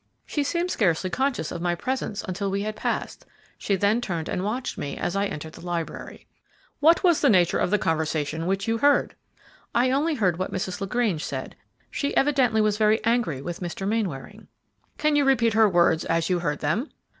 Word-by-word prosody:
"She 295 Hz, -, -1 dB
seemed 345 Hz, +5 st, -1 dB
scarcely 185 Hz, -2 st, +1 dB
conscious 265 Hz, -, -1 dB
of 170 Hz, -, -5 dB
my 175 Hz, 0 st, 0 dB
presence 255 Hz, 0 st, -3 dB
until 195 Hz, +1 st, -3 dB
we 200 Hz, +1 st, -1 dB
had 215 Hz, 0 st, -3 dB
passed; -, -, -3 dB, 0.4 s
she 200 Hz, -, 0 dB
then 205 Hz, +5 st, +2 dB
turned 170 Hz, -8 st, -3 dB
and 180 Hz, -, -2 dB
watched 240 Hz, +6 st, -3 dB
me 140 Hz, -, -5 dB
as 175 Hz, -, -2 dB
I 200 Hz, +1 st, +1 dB
entered 160 Hz, -4 st, -7 dB
the -, -, -12 dB
library." 175 Hz, -2 st, -5 dB, 0.5 s
"What 325 Hz, +6 st, +5 dB
was 345 Hz, -4 st, +4 dB
the 285 Hz, -, +4 dB
nature 180 Hz, -5 st, +3 dB
of -, -, +1 dB
the 210 Hz, -, +3 dB
conversation 160 Hz, -1 st, -1 dB
which 195 Hz, +2 st, -1 dB
you 225 Hz, 0 st, 0 dB
heard?" 285 Hz, +3 st, +3 dB, 0.6 s
"I 250 Hz, +2 st, +3 dB
only 300 Hz, +4 st, +1 dB
heard 185 Hz, -, +1 dB
what 185 Hz, -, -2 dB
Mrs. 190 Hz, +1 st, -4 dB
LaGrange 195 Hz, -5 st, 0 dB
said. -, -, -5 dB, 0.4 s
She 280 Hz, -, -2 dB
evidently 265 Hz, -6 st, +3 dB
was 210 Hz, -1 st, +1 dB
very 215 Hz, +1 st, +4 dB
angry 225 Hz, -, 0 dB
with 175 Hz, +2 st, -5 dB
Mr. 180 Hz, +2 st, -4 dB
Mainwaring." 200 Hz, -11 st, -3 dB, 0.5 s
"Can 305 Hz, -1 st, +2 dB
you 290 Hz, -, +4 dB
repeat 250 Hz, -5 st, +3 dB
her 220 Hz, -1 st, +5 dB
words 170 Hz, -3 st, +3 dB
as 165 Hz, +2 st, 0 dB
you 180 Hz, -, +2 dB
heard 150 Hz, -4 st, -2 dB
them?" 175 Hz, -, -1 dB
200 Hz, 195 wpm, -25 LUFS, 175-245 Hz, 0.6 s, What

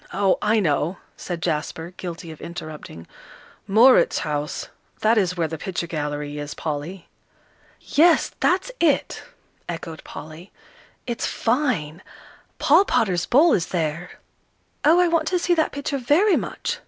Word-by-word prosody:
Oh, 195 Hz, -1 st, +2 dB
I 215 Hz, +1 st, +2 dB
know," 160 Hz, 0 st, 0 dB, 0.2 s
said 175 Hz, -2 st, -6 dB
Jasper, 160 Hz, +1 st, -3 dB
guilty 170 Hz, -2 st, -7 dB
of 155 Hz, -, -12 dB
interrupting, 155 Hz, -, -8 dB, 0.6 s
"Mauritshuis, 185 Hz, -, +3 dB, 0.3 s
that 220 Hz, +2 st, +4 dB
is 185 Hz, -4 st, +1 dB
where 165 Hz, -2 st, +1 dB
the 160 Hz, -1 st, -6 dB
picture 180 Hz, -1 st, -3 dB
gallery 150 Hz, -2 st, -4 dB
is, 145 Hz, 0 st, -6 dB
Polly." 160 Hz, +4 st, -5 dB, 0.7 s
"Yes, 330 Hz, +2 st, +3 dB
that's 380 Hz, +7 st, +1 dB
it," 310 Hz, -5 st, +1 dB, 0.5 s
echoed 165 Hz, -1 st, -6 dB
Polly; 160 Hz, +5 st, -10 dB, 0.5 s
"it's 235 Hz, -2 st, -2 dB
fine 225 Hz, -, -1 dB, 0.6 s
Paul 320 Hz, +7 st, +5 dB
Potter's 180 Hz, -, +1 dB
'Bull' 300 Hz, -, +5 dB
is 180 Hz, -2 st, +1 dB
there." 170 Hz, 0 st, -3 dB, 0.7 s
"Oh, 325 Hz, +4 st, +5 dB
I 360 Hz, -, +4 dB
want 330 Hz, -2 st, +1 dB
to 365 Hz, -, +1 dB
see 350 Hz, 0 st, +1 dB
that 320 Hz, -2 st, +1 dB
picture 285 Hz, 0 st, -3 dB
very 335 Hz, -, +3 dB
much!" -, -, -3 dB
180 Hz, 135 wpm, -23 LUFS, -, 0.7 s, Paul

